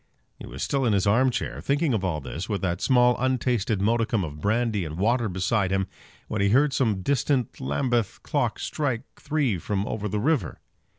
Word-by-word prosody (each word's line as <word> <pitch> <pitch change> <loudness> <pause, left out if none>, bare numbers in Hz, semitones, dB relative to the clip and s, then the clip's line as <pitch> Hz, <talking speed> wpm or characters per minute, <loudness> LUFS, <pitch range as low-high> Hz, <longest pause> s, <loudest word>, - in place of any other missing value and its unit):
He - - -9
was 65 +2 -6
still 140 -2 0
in 115 -4 +2
his 100 -1 +2
arm 120 +6 +4
chair, 125 - -3
thinking 145 0 +1
of 105 -4 0
all 85 -5 -1
this, 80 +9 -6
with 100 -2 -2
that 90 -2 -1
small 125 -1 +4
untasted 120 -5 0
modicum 115 -1 +1
of 75 -2 -7
brandy 110 0 +1
and 80 0 -6
water 115 +3 +1
beside 95 +2 0
him, 95 0 +1 0.4
when 105 - -2
he 100 - +3
heard 135 +6 +4
some 110 -9 +1
distant 135 -2 0
Lambeth 105 - -1
clock 135 -7 0
strike 130 -6 -2 0.2
three 140 - 0
from 100 +3 -2
over 105 -1 -3
the 105 - -1
river. 150 +5 0
110 Hz, 190 wpm, -25 LUFS, 95-130 Hz, 0.4 s, arm